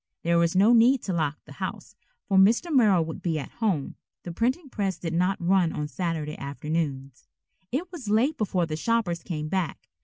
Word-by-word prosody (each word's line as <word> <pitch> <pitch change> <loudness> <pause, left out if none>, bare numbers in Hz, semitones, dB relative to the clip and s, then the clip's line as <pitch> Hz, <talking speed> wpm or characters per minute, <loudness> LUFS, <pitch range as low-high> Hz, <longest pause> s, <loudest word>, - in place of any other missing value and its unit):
There 170 0 +3
was 170 +1 +1
no 205 +5 +5
need 240 +2 +5
to 190 - -2
lock 155 -3 -1
the - - -15
house, - - -6 0.3
for 200 - 0
Mr. 225 - +4
Merrill 200 -9 +4
would 160 - -7
be 165 -3 -1
at 140 - -6
home. 200 - -2 0.3
The 175 - -6
printing 255 - -1
press 195 -8 -2
did 165 -2 -4
not 180 +3 +1
run 175 -1 +2
on 150 - -3
Saturday 160 -2 -3
afternoons. 140 -2 -4 0.4
It 335 +9 -3
was 285 - -7
late 240 +9 +2
before 190 - 0
the 155 -1 -4
shoppers 180 -2 0
came 155 -3 -4
back. 185 0 -3
180 Hz, 190 wpm, -26 LUFS, 160-225 Hz, 0.4 s, no